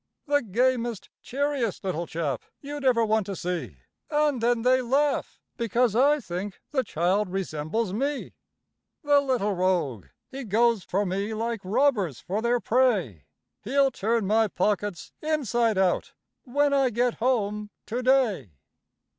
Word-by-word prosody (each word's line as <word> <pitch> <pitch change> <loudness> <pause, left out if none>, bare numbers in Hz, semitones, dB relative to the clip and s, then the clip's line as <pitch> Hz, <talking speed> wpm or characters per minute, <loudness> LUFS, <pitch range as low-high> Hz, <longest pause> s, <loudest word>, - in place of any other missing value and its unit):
The 290 -1 +2
gamest, 235 -1 0
cheeriest 275 -5 -2
little 175 -3 -2
chap, 150 -7 -2 0.2
you'd 290 0 -7
ever 240 -3 +3
want 220 -2 +1
to 195 - -4
see! 180 0 -4 0.3
And 295 -4 +1
then 235 0 +1
they 255 +1 +4
laugh, 275 +4 0 0.2
because 235 -1 +1
I 285 +5 +4
think 190 -2 -6
the 265 -3 +1
child 185 +2 0
resembles 185 +3 -2
me. 275 +6 -2 0.7
The 290 -1 +4
little 250 -7 0
rogue! 175 - 0 0.2
he 270 0 -6
goes 225 -1 +2
for 200 +4 -1
me, 200 +4 -2
like 230 -1 -2
robbers 205 - +1
for 200 +4 -3
their 240 +1 +2
prey; 210 - +1 0.4
He'll 275 +4 +2
turn 230 -1 0
my 220 +2 +3
pockets 205 -1 -2
inside 240 -8 +1
out, 190 -2 +1 0.3
when 285 +3 +1
I 270 -2 +3
get 240 +1 0
home 210 -4 0 0.2
to 240 +3 -3
day. 245 - +2
230 Hz, 140 wpm, -26 LUFS, 195-260 Hz, 0.7 s, they